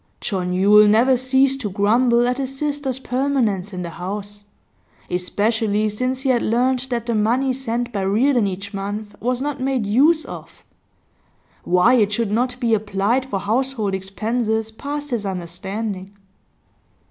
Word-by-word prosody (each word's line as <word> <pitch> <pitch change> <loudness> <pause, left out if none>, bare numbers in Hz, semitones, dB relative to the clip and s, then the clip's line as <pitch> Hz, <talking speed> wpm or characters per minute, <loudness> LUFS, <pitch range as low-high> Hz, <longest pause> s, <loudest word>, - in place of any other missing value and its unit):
John 185 -4 -2
Yule 205 +3 +6
never 235 +5 +4
ceased 265 +2 +2
to 210 - -2
grumble 235 +5 +3
at 250 +2 -1
his 270 0 -4
sister's 290 -3 -2
permanence 250 -7 -1
in 180 -2 -5
the 170 - -6
house, 205 +4 -6 0.7
especially 210 +4 0
since 255 +5 -2
he 270 - -1
had 245 -2 +3
learnt 250 +3 +1
that 235 -2 -2
the 235 - -1
money 240 +5 +1
sent 245 -2 -3
by 200 - -1
Reardon 220 +4 +2
each 195 +2 -6
month 205 +2 -5
was 250 +2 -1
not 290 -1 -3
made 260 -4 0
use 295 +10 +3
of; - - -10 1.0
why 180 +7 +4
it 215 -5 +3
should 225 -2 -1
not 250 +3 0
be 235 -3 +1
applied 215 +4 0
for 195 -7 -3
household 225 -1 -1
expenses 220 +3 -2
passed 290 +5 -6
his 235 -4 -1
understanding. 190 +2 -5
225 Hz, 150 wpm, -21 LUFS, 205-255 Hz, 1.0 s, Yule